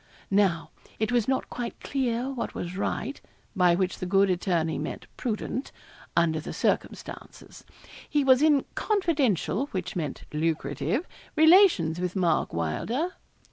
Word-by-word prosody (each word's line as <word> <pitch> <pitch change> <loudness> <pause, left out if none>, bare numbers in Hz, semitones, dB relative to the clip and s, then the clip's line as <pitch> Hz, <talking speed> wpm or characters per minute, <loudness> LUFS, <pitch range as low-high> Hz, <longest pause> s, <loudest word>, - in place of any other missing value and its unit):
Now, 190 -4 +2 0.3
it 220 +1 0
was 240 -3 +2
not 265 0 0
quite 240 -1 -5
clear 255 -1 -1
what 260 - -4
was 175 +1 -5
right 195 - -3 0.3
by 180 -3 +4
which 185 0 -1
the 185 - -3
good 195 +1 +4
attorney 170 -3 0
meant - - -5
prudent 245 +3 -3 0.5
under 160 -2 +3
the 155 - -6
circumstances. - - -3 0.5
He 295 -1 +2
was 260 0 +5
in 300 -3 +4
confidential 285 - +1
which 185 -7 -4
meant 150 -6 -3
lucrative 160 - -1 0.3
relations 315 - +5
with 180 +1 -2
Mark 175 -5 +1
Wylder. 225 - -1
195 Hz, 135 wpm, -27 LUFS, 170-265 Hz, 0.5 s, was